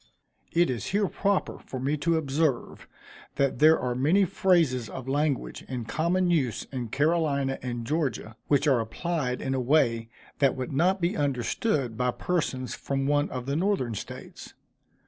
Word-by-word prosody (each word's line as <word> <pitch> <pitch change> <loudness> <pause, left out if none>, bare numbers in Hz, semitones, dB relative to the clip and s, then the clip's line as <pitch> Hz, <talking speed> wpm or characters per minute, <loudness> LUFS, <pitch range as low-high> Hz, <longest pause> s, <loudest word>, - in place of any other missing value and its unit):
It 170 -3 +3
is 125 - -4
here 200 +1 +1
proper 200 0 -1
for 130 - -7
me 140 +4 0
to 165 +3 +1
observe, 145 -3 -1 0.5
that 140 -3 +1
there 155 +1 +6
are 125 -1 -1
many 155 +11 +3
phrases 160 - +2
of 130 -1 -7
language 145 0 -1
in 125 -3 -4
common 175 +8 +1
use 135 -9 0
in 125 -3 -3
Carolina 140 -1 +1
and 120 -2 -4
Georgia, 130 -7 -2
which 145 +1 +3
are 135 -4 +4
applied 125 +3 -2
in 135 - -1
a 130 - 0
way 120 -4 +2 0.3
that 140 -2 +3
would 130 0 -4
not 180 +7 +2
be 170 +1 +1
understood 135 - -1
by 125 0 +1
persons 130 -4 -2
from 135 -1 -2
one 145 +1 +2
of 125 -1 -5
the 140 +1 -1
Northern 170 - 0
States. 105 - -9
140 Hz, 165 wpm, -27 LUFS, 125-165 Hz, 0.5 s, there